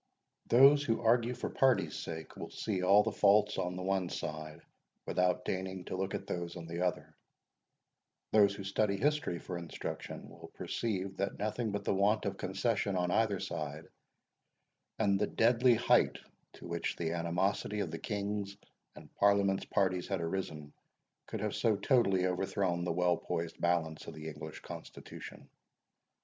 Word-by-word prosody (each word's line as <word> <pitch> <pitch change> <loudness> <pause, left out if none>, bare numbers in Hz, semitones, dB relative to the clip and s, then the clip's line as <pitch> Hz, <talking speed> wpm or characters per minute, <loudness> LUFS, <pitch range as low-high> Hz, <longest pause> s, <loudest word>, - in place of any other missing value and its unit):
Those 140 +4 +7
who 115 -5 0
argue 120 +1 +3
for - - -3
party's 135 -2 +2
sake, 80 -1 -6
will - - -7
see 100 -4 -2
all 100 +3 +6
the - - -1
faults 105 +1 +4
on 90 0 -2
the 90 - -5
one 95 -2 0
side, 75 -1 -5 0.5
without 90 0 +1
deigning 95 -1 -3
to - - -4
look 95 +1 -2
at - - -5
those 85 -1 -4
on 85 -2 -7
the 85 +1 -4
other; 90 -2 -2 1.2
those 100 -2 +5
who 100 - -7
study 100 +1 0
history 150 -9 +1
for 90 +1 -5
instruction, 85 - -6
will - - -12
perceive 95 -4 -3
that 100 - -2
nothing 110 +2 -2
but 105 - -3
the - - +1
want 105 +3 +2
of 100 - -2
concession 100 +1 0
on 90 -1 0
either 105 -3 +2
side, - - -5 1.1
and 100 -3 +2
the 105 - +1
deadly 120 +1 +4
height 115 - +3 0.4
to - - -12
which 85 0 -2
the 80 -1 -2
animosity 90 +5 -1
of 90 -5 -3
the 80 - -5
King's 100 -1 -3 0.4
and - - -14
Parliament's 100 -1 +3
parties 95 -2 0
had - - -1
arisen, 80 -4 -4 0.5
could - - -5
have - - -1
so 110 -2 +2
totally 100 -4 +3
overthrown 90 -1 0
the - - 0
well 90 +1 +2
poised 80 0 -4
balance 80 -2 0
of - - -7
the 80 0 -7
English 75 0 -8
constitution. - - -10
95 Hz, 160 wpm, -33 LUFS, 85-105 Hz, 1.2 s, Those